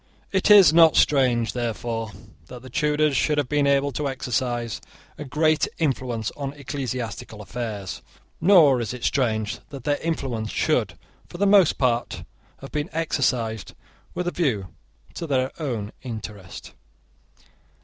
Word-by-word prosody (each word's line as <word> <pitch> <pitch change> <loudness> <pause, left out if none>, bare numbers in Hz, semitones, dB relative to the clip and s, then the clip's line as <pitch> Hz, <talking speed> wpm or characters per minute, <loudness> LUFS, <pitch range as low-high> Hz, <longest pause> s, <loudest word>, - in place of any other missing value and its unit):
It 190 +1 +1
is 195 -7 +8
not 165 -1 +6
strange, 125 -6 +3
therefore, 115 -1 -3 0.4
that 125 +4 -10
the 130 - -11
Tudors 150 0 +1
should 150 +2 +1
have 145 -3 0
been 145 0 +1
able 140 0 +2
to 140 +2 -2
exercise 120 -3 -2 0.3
a - - -7
great 155 +3 +1
influence 125 -7 -1
on 140 -1 -5
ecclesiastical 130 -6 -5
affairs; 105 -3 -5 0.4
nor 160 -8 +6
is 115 +1 -4
it 125 - -10
strange 110 -5 0
that 135 -3 -9
their 145 +1 +1
influence 130 -9 -3
should, - - 0 0.3
for - - -9
the 200 - +1
most 195 -4 +5
part, 120 -2 0 0.4
have 135 - -10
been 150 +2 -3
exercised 130 -9 -1 0.4
with 180 0 -2
a - - 0
view 115 - -1 0.4
to 165 - -5
their 130 -2 0
own 115 -8 -3
interest. 105 -6 -8
130 Hz, 140 wpm, -24 LUFS, 115-150 Hz, 0.4 s, is